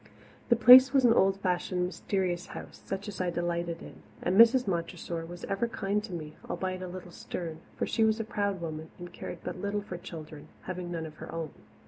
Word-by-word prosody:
The 235 - +6
Place 255 +3 +9
was 270 -2 +5
an 230 - +7
old 195 -2 +3
fashioned, 180 -1 0
mysterious 180 0 -2
house, - - -9
such 195 +2 -4
as 195 -3 -4
I 180 - +1
delighted 170 -1 -2
in, - - -12 0.2
and 180 - +1
Mrs. 235 +3 +7
Montressor 170 -2 -3
was 175 +1 -9
ever 200 +4 -1
kind 205 -2 -1
to - - -11
me, 155 -3 -6
albeit 185 -1 -3
a 185 - -4
little 180 0 -8
stern, 165 -1 -6 0.2
for - - -1
she 225 - +1
was 220 0 +3
a - - 0
proud 200 -3 -2
woman 160 -1 -5
and 175 -1 -9
cared - - -7
but 180 - -5
little 200 0 -1
for 185 -3 -6
children, 155 -4 -9 0.2
having 180 -1 -5
none 165 -2 -3
of 155 -1 -10
her - - -8
own. 165 -2 -4
180 Hz, 210 wpm, -30 LUFS, 170-200 Hz, 0.2 s, Place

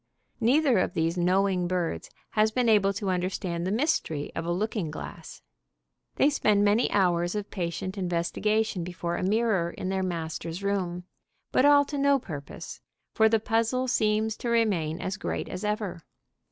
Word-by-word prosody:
Neither 255 -1 +3
of 180 - -1
these 165 +1 +1
knowing 185 0 +2
birds 175 -2 -2 0.2
has 215 0 +3
been 245 +2 0
able 205 -3 +4
to 200 -1 -2
understand 180 -1 -2
the - - -1
mystery 210 - 0
of 165 - -4
a - - 0
looking 200 -1 -1
glass. 150 - -9 0.7
They - - +4
spend 210 -7 +3
many 210 +4 +3
hours 175 -2 +1
of 210 -1 -4
patient 185 +1 -4
investigation 185 +3 0
before 170 0 -4
a - - -3
mirror 205 -3 +1
in 185 - -5
their 190 0 0
master's 165 0 -4
room, 180 -3 -1 0.5
but 260 - +3
all 285 0 +6
to 285 0 -4
no 280 0 +4
purpose, 150 - -8 0.3
for 220 0 +4
the 225 0 +3
puzzle 230 +4 0
seems 220 -2 +1
to 240 - -4
remain 190 -9 +1
as 190 +2 -3
great - - -3
as 185 - -6
ever. 210 -5 -2
195 Hz, 165 wpm, -27 LUFS, 175-220 Hz, 0.7 s, all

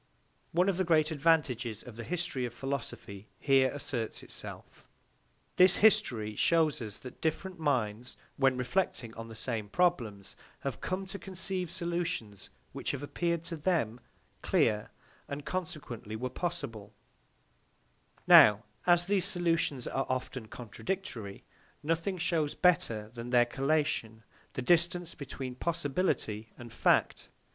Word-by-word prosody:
One 180 +3 +3
of 195 -3 +1
the 190 - +2
great 160 -2 +3
advantages 135 -8 +1
of 120 - -11
the 115 - -6
history 165 -6 -1
of 120 -1 -4
philosophy 120 -7 -5
here 135 -2 +4
asserts 130 -5 -4
itself. - - -10 0.7
This 185 0 +7
history 130 - +3
shows 160 -2 +3
us 105 -3 -6
that 125 - -11
different 180 +3 -2
minds 125 -6 -1 0.2
when 135 -2 +3
reflecting 125 -3 -1
on 115 0 -8
the 115 - -10
same 110 -2 -3
problems 115 - 0 0.3
have 140 - -4
come 185 +1 -2
to 190 +1 -6
conceive 190 -1 -3
solutions 170 - -3 0.2
which - - -4
have 140 0 -4
appeared 170 +2 -1
to 165 - -3
them 150 -8 0 0.4
clear, 105 -2 +2 0.4
and 140 0 -6
consequently 150 - -5
were 125 +3 -3
possible; 115 - -4 1.3
now, 105 0 +8 0.2
as 175 0 +5
these 190 -1 +2
solutions 165 - 0
are 135 - -2
often 130 -2 -3
contradictory, 115 - -5 0.4
nothing 165 +5 0
shows 160 -3 0
better 115 -12 +2
than 120 0 -6
their 120 -1 +5
collation 135 -4 0 0.3
the 130 - -3
distance 175 +3 +2
between 135 -2 -6
possibility 135 - -1
and 120 -2 -10
fact. - - +2
140 Hz, 130 wpm, -31 LUFS, 115-175 Hz, 1.3 s, now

